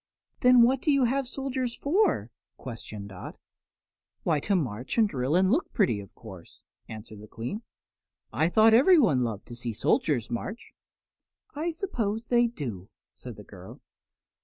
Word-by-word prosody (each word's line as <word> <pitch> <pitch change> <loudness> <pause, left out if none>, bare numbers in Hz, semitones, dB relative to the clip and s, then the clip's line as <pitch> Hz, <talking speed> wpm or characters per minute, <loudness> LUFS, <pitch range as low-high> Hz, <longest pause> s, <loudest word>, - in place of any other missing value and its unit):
"Then 250 -1 +6
what 255 +2 +3
do 305 - +2
you 275 -2 +3
have 265 +2 0
soldiers 260 -2 -3
for?" 310 - +1 0.3
questioned 110 -4 -8
Dot. 95 -2 -9 0.9
"Why, 155 -3 +1
to 200 +7 0
march 125 - -3
and 225 -2 +5
drill 135 -3 -1
and 185 +1 +3
look 305 +9 0
pretty, 180 - +2
of 100 - -12
course," 95 -7 -13 0.3
answered 110 -1 -9
the 105 - -12
Queen. 120 - -6 0.7
"I 160 +2 +2
thought 220 +4 +5
everyone 235 - +5
loved 110 -4 -4
to 120 - -8
see 120 -1 -5
soldiers 120 +2 0
march." 190 - -6 0.8
"I 315 +3 -2
suppose 235 - -3
they 240 0 +3
do," 115 - -7 0.2
said 125 -3 -10
the 105 - -12
girl. 95 -2 -13
180 Hz, 155 wpm, -27 LUFS, -, 0.9 s, Then